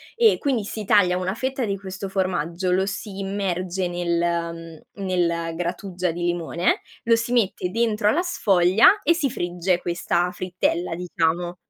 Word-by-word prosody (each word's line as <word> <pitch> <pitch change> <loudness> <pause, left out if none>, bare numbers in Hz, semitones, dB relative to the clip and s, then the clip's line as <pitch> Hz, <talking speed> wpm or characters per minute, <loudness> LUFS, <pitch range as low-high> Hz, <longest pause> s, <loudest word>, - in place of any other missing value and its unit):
e 455 -2 +5
quindi 265 -7 0
si 210 0 -6
taglia 180 -3 +4
una 185 +2 -2
fetta 260 0 -2
di 200 -2 -2
questo 190 0 -6
formaggio, 180 -2 -1
lo 190 +1 +2
si 195 0 -5
immerge 190 -2 -2
nel 170 -2 -2
mhmm, 200 - -6
nel 170 -2 0
grattugia 180 +1 -2
di 175 +1 -5
limone, 175 0 0 0.2
lo 230 0 +4
si 230 +1 -2
mette 200 -6 +1
dentro 215 0 +1
alla 340 +11 +2
sfoglia 205 - +4
e 335 - +4
si 310 -5 0
frigge 175 -2 -1
questa 175 0 0
frittella, 180 -1 -2
diciamo. 175 0 -1
185 Hz, 155 wpm, -23 LUFS, 175-205 Hz, 0.2 s, e